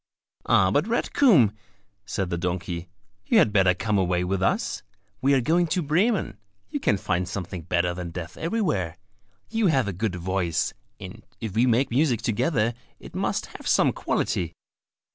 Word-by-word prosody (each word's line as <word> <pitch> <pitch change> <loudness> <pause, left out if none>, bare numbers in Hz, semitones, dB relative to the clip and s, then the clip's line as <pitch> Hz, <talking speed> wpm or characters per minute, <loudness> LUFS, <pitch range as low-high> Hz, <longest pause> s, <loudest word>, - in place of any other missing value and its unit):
"Ah, 95 -1 +4
but 145 - +2
red 235 +1 -1
comb," 175 - +5 0.6
said 95 -2 -2
the 85 - -1
donkey, 90 -1 -3 0.4
"you - - +4
had 105 - +4
better 95 -3 +4
come 105 +1 0
away 90 -1 +1
with 95 +1 -1
us. 95 - 0 0.4
We 140 +1 +4
are 130 - +3
going 170 +7 +2
to 175 +2 0
Bremen; 165 - +1 0.3
you - - -2
can 100 - +2
find 95 -3 -1
something 95 -3 -5
better 90 +1 0
than 90 -1 -5
death 85 0 -7
everywhere: 130 - -1 0.5
you 225 -2 +2
have 135 - +2
a 100 - -2
good 100 +1 -2
voice, 90 -1 -1 0.3
and - - -10 0.2
if 110 -4 -5
we 115 +4 +3
make 120 +3 +2
music 125 -3 +2
together 120 0 +1 0.3
it - - -12
must - - -1
have - - -9
some - - +3
quality!" 85 -1 -1
100 Hz, 170 wpm, -25 LUFS, 90-140 Hz, 0.6 s, comb